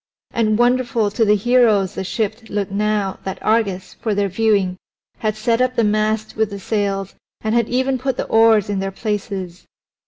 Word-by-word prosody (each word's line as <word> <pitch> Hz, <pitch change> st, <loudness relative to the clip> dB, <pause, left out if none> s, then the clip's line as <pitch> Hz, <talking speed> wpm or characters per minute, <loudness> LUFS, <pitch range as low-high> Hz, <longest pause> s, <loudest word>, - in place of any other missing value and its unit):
And 215 Hz, -2 st, +1 dB
wonderful 240 Hz, -3 st, +2 dB
to 225 Hz, -, +1 dB
the 210 Hz, -1 st, +4 dB
heroes 215 Hz, -3 st, +3 dB
the 190 Hz, -, -4 dB
ship 220 Hz, +3 st, -3 dB
looked 200 Hz, -2 st, -2 dB
now 205 Hz, -1 st, -1 dB
that 190 Hz, -, -4 dB
Argus, 200 Hz, -4 st, 0 dB
for 215 Hz, -3 st, -1 dB
their 200 Hz, -1 st, +1 dB
viewing, 195 Hz, -2 st, +1 dB, 0.4 s
had 215 Hz, -1 st, -1 dB
set 230 Hz, +2 st, 0 dB
up 255 Hz, 0 st, +1 dB
the 235 Hz, -, +2 dB
mast 215 Hz, +1 st, 0 dB
with 220 Hz, -1 st, +1 dB
the 200 Hz, -1 st, -7 dB
sails 195 Hz, -1 st, -2 dB, 0.3 s
and 220 Hz, 0 st, -1 dB
had 235 Hz, -2 st, +2 dB
even 260 Hz, +1 st, 0 dB
put 265 Hz, -1 st, -2 dB
the -, -, -2 dB
oars 225 Hz, -2 st, +4 dB
in 205 Hz, -1 st, -2 dB
their 195 Hz, 0 st, -2 dB
places. 195 Hz, -3 st, -4 dB
215 Hz, 185 wpm, -20 LUFS, 200-230 Hz, 0.4 s, the